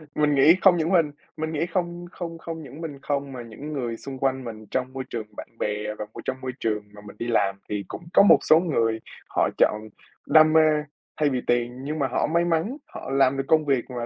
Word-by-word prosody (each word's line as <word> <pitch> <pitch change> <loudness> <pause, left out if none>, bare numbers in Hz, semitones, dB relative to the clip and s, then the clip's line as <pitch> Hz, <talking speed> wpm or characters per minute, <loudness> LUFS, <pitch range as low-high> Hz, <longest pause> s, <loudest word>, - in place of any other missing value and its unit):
Mình 150 -1 +2
nghĩ 150 +6 +7
không 180 -3 +6
những 165 +3 0
mình 165 -5 +3 0.3
mình 160 +1 -3
nghĩ 160 +2 0
không 175 0 -3
không 165 -2 -6
không 165 -1 -7
những 145 +3 -10
mình 145 -4 -6
không 140 -1 -2
mà 125 - -6
những 140 +7 -8
người 120 -5 -3
xung 135 -1 -8
quanh 130 -1 0
mình 110 -2 -8
trong 130 0 -2
môi 130 0 -4
trường 110 -3 -5
bạn - - -7
bè 105 0 -2
và 105 - -4
môi - - -8
trong 130 0 -3
môi 130 0 -3
trường 105 -2 -1
mà 105 - -12
mình 105 - -11
đi 120 - -3
làm 100 -4 +2
thì 105 -1 -2
cũng 170 - -8
có - - +7
một - - +8
số 160 - +5
người 115 -10 0 0.3
họ - - +1
chọn 105 0 +3 0.5
đam 155 0 +6
mê 160 - +7 0.6
thay 150 -1 +2
vì 130 -2 -1
tiền. 120 +2 0
Nhưng 155 +2 -3
mà 135 - +1
họ 125 - 0
may 170 +2 +2
mắn, 175 - 0
họ - - -8
làm 135 0 +3
được 135 - 0
công 155 -1 +4
việc 135 -4 +1
mà 120 -2 -4
135 Hz, 245 wpm, -25 LUFS, 120-160 Hz, 0.6 s, một